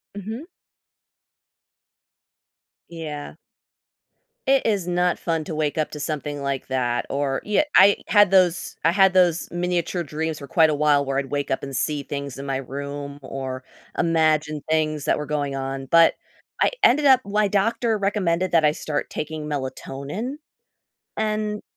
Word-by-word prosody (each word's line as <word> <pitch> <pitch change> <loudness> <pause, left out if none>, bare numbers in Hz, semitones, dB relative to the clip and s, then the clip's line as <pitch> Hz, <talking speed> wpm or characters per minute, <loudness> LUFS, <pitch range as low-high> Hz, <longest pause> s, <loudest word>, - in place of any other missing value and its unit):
Mhm. 220 - -6 2.4
Yeah. 155 -3 -7 1.1
It 270 0 +3
is 200 -5 0
not 180 0 +1
fun 165 -2 -1
to 160 - -6
wake 155 -1 -1
up 155 - -1
to 150 - -7
something 145 -1 -4
like 140 -1 -3
that 120 -2 -1
or 140 -1 -1
ye 210 +7 +2
I 200 +1 +7
had 205 -3 +5
those 180 -3 +2
I 165 - +4
had 190 0 +5
those 175 -3 +2
miniature 175 0 -1
dreams 160 0 -3
for 140 - -9
quite 160 +3 +4
a 155 - +1
while 145 -1 +3
where 135 -1 -2
I'd 140 - -3
wake 145 0 -2
up 135 - -1
and 135 -1 -5
see 145 +2 -1
things 140 -1 -6
in 140 - -6
my 135 -1 -2
room 140 +2 -6
or 130 -1 -6 0.3
imagine 155 -3 +2
things 155 -2 0
that - - +1
were 150 - -4
going 145 -2 -2
on, 135 0 -4
but 165 0 +6 0.5
I - - +4
ended 290 +5 +4
up 265 -2 +7
My 205 0 +1
doctor 220 +3 +1
recommended 185 -3 0
that 165 -2 +5
I 150 - +5
start 150 -1 -3
taking 155 0 -5
melatonin, 145 - -5 0.8
and 215 -1 -1
155 Hz, 155 wpm, -23 LUFS, 140-185 Hz, 2.4 s, I